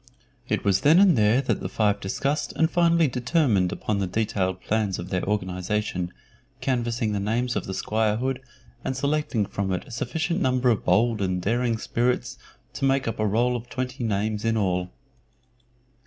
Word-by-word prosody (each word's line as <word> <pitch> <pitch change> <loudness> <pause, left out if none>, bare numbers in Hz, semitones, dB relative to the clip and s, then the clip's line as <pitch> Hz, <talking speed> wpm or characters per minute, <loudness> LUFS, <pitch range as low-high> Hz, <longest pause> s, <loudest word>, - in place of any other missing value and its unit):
It - - 0
was 100 -1 +3
then 155 +4 +6
and 190 -4 +6
there 110 +3 +4
that - - 0
the - - -4
five 105 -2 +1
discussed 140 +10 -2
and 160 +1 +1
finally 170 -2 +4
determined 125 - +1
upon 105 -2 -2
the 95 - 0
detailed 95 -2 -1
plans 105 -3 0
of 90 - -6
their 90 -2 0
organization, 95 -1 -2 0.5
canvassing 120 -4 -1
the 105 - -1
names 120 +5 -1
of - - -2
the 95 - -4
squirehood, 110 +6 0 0.4
and 130 -1 -2
selecting 140 -6 0
from 95 0 -3
it 90 -1 -2
a - - -14
sufficient 160 +7 -2
number 130 -1 +2
of 110 - 0
bold 115 -1 +3
and 95 -1 0
daring 115 +4 0
spirits 125 +2 -1 0.3
to 135 - -2
make 135 -1 +2
up 115 - -3
a 110 - +2
roll 120 +4 +2
of 120 0 -6
twenty 130 0 -4
names 105 0 -1
in 115 0 +1
all. 90 -3 0
115 Hz, 175 wpm, -25 LUFS, 100-130 Hz, 0.5 s, then